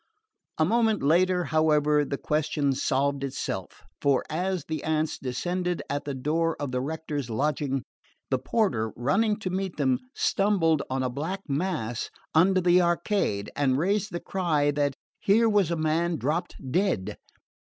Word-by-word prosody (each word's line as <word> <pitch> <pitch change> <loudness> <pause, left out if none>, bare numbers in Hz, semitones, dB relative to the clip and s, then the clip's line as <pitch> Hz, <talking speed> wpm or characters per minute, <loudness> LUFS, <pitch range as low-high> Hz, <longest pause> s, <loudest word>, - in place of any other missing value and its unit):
A 155 - +3
moment 220 +2 +2
later, 180 +4 +3
however, 150 -2 +3
the 140 -1 -3
question 150 -2 0
solved 140 +1 0
itself; 130 -8 -4 0.2
for 140 -2 +3
as 180 0 -1
the 160 -1 -4
aunts 155 0 0
descended 175 +7 -2
at 145 +1 -2
the 140 -2 -3
door 160 +5 0
of 145 -3 -3
the 125 0 -1
rector's 145 -2 -4
lodging, 135 +1 -1 0.5
the 130 - +2
porter, 125 - 0
running 205 - +1
to 185 - -2
meet 190 -1 -3
them, 130 -4 +2 0.2
stumbled 180 -7 +2
on 130 0 -1
a 130 - 0
black 165 +9 -3
mass 140 -7 -2 0.2
under 185 +3 +4
the 180 0 +5
arcade, 170 - 0
and 130 -2 +2
raised 200 +6 0
the 175 - -3
cry 155 -7 +1
that 145 -1 0 0.2
here 225 +4 +4
was 205 -6 +3
a 170 - 0
man 165 +2 +1
dropped 160 +5 -2 0.2
dead. 105 - 0
155 Hz, 150 wpm, -27 LUFS, 140-180 Hz, 0.5 s, the